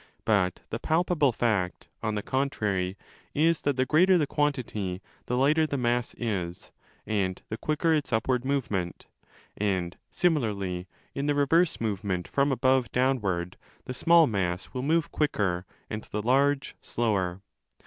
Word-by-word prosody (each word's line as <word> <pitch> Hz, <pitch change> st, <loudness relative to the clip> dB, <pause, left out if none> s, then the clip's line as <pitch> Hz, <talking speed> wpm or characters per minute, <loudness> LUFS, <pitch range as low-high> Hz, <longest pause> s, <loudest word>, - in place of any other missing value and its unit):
But 100 Hz, -5 st, +2 dB
the 115 Hz, -, -2 dB
palpable 160 Hz, -3 st, +2 dB
fact, 105 Hz, -7 st, -1 dB
on 110 Hz, -2 st, -1 dB
the 105 Hz, -, -2 dB
contrary, 105 Hz, -9 st, -1 dB, 0.4 s
is 160 Hz, +2 st, +3 dB
that 140 Hz, -2 st, 0 dB
the 130 Hz, -, +2 dB
greater 180 Hz, +7 st, +5 dB
the 155 Hz, -, +2 dB
quantity, 125 Hz, -11 st, -1 dB, 0.3 s
the 125 Hz, -, 0 dB
lighter 155 Hz, +4 st, +3 dB
the 140 Hz, -, -2 dB
mass 120 Hz, -1 st, 0 dB
is 90 Hz, -7 st, -3 dB, 0.3 s
and 95 Hz, -4 st, 0 dB
20 -, -, -21 dB
the 110 Hz, -, -3 dB
quicker 155 Hz, +4 st, +1 dB
its 150 Hz, -4 st, 0 dB
upward 120 Hz, +2 st, +1 dB
movement: 115 Hz, -10 st, -2 dB, 0.5 s
and, 95 Hz, -4 st, -1 dB
similarly, 100 Hz, -, 0 dB, 0.3 s
in 140 Hz, +1 st, -2 dB
the 145 Hz, -, +2 dB
reverse 160 Hz, +4 st, +3 dB
movement 100 Hz, -5 st, -2 dB
from 140 Hz, 0 st, +1 dB
above 130 Hz, 0 st, +2 dB
downward, 100 Hz, -9 st, 0 dB, 0.3 s
the 125 Hz, -, -4 dB
small 165 Hz, +5 st, +5 dB
mass 95 Hz, -6 st, -2 dB
will 130 Hz, -, -2 dB
move 160 Hz, +4 st, +1 dB
quicker 95 Hz, -, 0 dB, 0.2 s
and 110 Hz, 0 st, -5 dB
the 105 Hz, 0 st, -4 dB
large 140 Hz, +3 st, +2 dB
slower. 95 Hz, -5 st, -1 dB
120 Hz, 150 wpm, -27 LUFS, 100-145 Hz, 0.5 s, greater